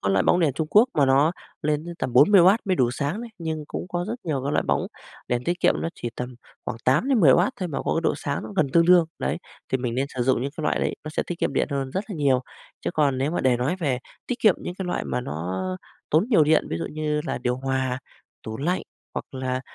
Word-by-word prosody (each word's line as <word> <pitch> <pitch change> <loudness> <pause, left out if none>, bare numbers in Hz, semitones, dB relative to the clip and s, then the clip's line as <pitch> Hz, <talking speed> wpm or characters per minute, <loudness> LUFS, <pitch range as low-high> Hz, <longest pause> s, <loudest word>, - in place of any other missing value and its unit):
có 100 - -1
loại 95 -1 +3
bóng 175 - +3
đèn 155 -5 +3
Trung 155 +4 -2
Quốc 220 +5 +6
mà 140 -2 +4
nó 140 +5 +4 0.3
lên 150 0 0
đến 175 0 -6
tầm 130 - -2
40W 185 - +7
mới 185 -2 +1
đủ 125 -5 +3
sáng 145 - -2
đấy, 235 -1 -7
nhưng 160 -2 -3
cũng - - -5
có 175 0 -2
rất 230 - -1
nhiều 145 -5 -1
cái 140 - -1
loại - - +2
bóng - - +1 0.4
đèn 125 0 -1
tiết 175 +1 -1
kiệm, - - +4
nó - - 0
chỉ 120 - -5
tầm 125 0 -5 0.3
khoảng - - -4
8-10W 165 - +4
thôi 180 - -1
mà 150 - -3
có - - +1
độ - - +2
sáng 145 -1 -3
nó 110 - -8
gần 155 - +3
tương 170 0 +5
đương, 180 -1 +7
đấy. 65 - -1 0.4
Thì 130 - +3
mình 125 -2 -2
nên 135 +2 0
sử 125 - 0
dụng 125 -1 +2
những 140 - -2
cái 160 - -4
loại - - +1
đấy, - - 0
nó - - -5
sẽ - - -1
tiết 175 - -5
kiệm - - 0
điện - - +1
hơn 135 -1 -2
rất 190 +8 -2
là - - -3
nhiều, 135 -4 +3 0.4
chứ - - -2
còn 140 -4 +2
nếu 135 +3 0
mà 175 - -1
để 130 -2 +3
nói 130 +9 -1
về 140 -9 0 0.3
tiết 250 - -2
kiệm 215 -5 +6
những 175 - -6
cái 190 - -5
loại 175 - -2
mà 65 -3 -2
nó 80 +8 -4 0.5
tốn 155 +5 +4
nhiều 200 -11 +5
điện, 155 +1 +3
ví - - -1
dụ 85 - -3
như 150 -1 -2
là - - -2
điều 125 0 -1
hòa, 130 -1 -1 0.4
tủ 110 0 -6
lạnh 175 +8 -1 0.3
hoặc - - -3
là, 130 -1 -2
145 Hz, 265 wpm, -24 LUFS, 130-175 Hz, 0.5 s, 40W